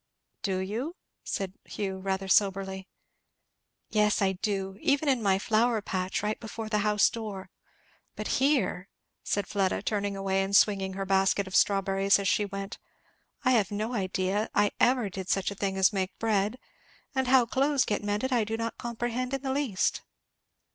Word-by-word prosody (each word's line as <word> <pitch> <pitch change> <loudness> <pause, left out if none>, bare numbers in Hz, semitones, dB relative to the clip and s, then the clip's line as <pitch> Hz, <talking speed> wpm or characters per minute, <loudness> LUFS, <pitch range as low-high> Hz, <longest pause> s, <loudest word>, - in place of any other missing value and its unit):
"Do 190 -3 -1
you?" 225 - -3 0.3
said 190 -2 -3
Hugh, 190 -2 -4
rather 190 0 -2
soberly. 190 -1 +1 1.0
"Yes 210 -1 +3
I 195 -1 +2
do, 195 0 -3
even 285 +2 +2
in 260 -4 +2
my 195 -3 +3
flower 225 +3 +2
patch, 190 -1 -2
right 210 +1 -1
before 220 -1 -6
the 210 -1 +1
house 210 -1 +4
door; 210 -4 -6 0.6
but - - -5 0.2
here 265 -9 +1 0.2
" - - -53
said 205 -1 -1
Fleda, 195 -1 0
turning 205 -2 -1
away 195 0 0
and 195 +1 0
swinging 195 -2 +3
her 195 +1 -3
basket 195 +1 +2
of 190 - -6
strawberries 195 0 +3
as 200 -1 -2
she 205 - +2
went, 195 0 -6 0.7
"I 255 - +5
have 215 -7 +3
no 215 +4 -3
idea 190 0 -1
I 205 - +3
ever 245 -3 +3
did 190 -1 -6
such 195 0 +1
a - - -6
thing 195 -1 -2
as 190 +2 +4
make 190 -1 -2
bread! 215 +1 0 0.6
and 265 -1 0
how 255 -1 +5
clothes 275 +3 +2
get 210 - -1
mended 210 +6 -1
I 235 -3 +3
do 220 +1 -3
not 230 0 -4
comprehend 240 +2 -2
in 270 - -6
the 265 -1 -1
least!" 265 -9 0
205 Hz, 175 wpm, -28 LUFS, 195-230 Hz, 1.0 s, I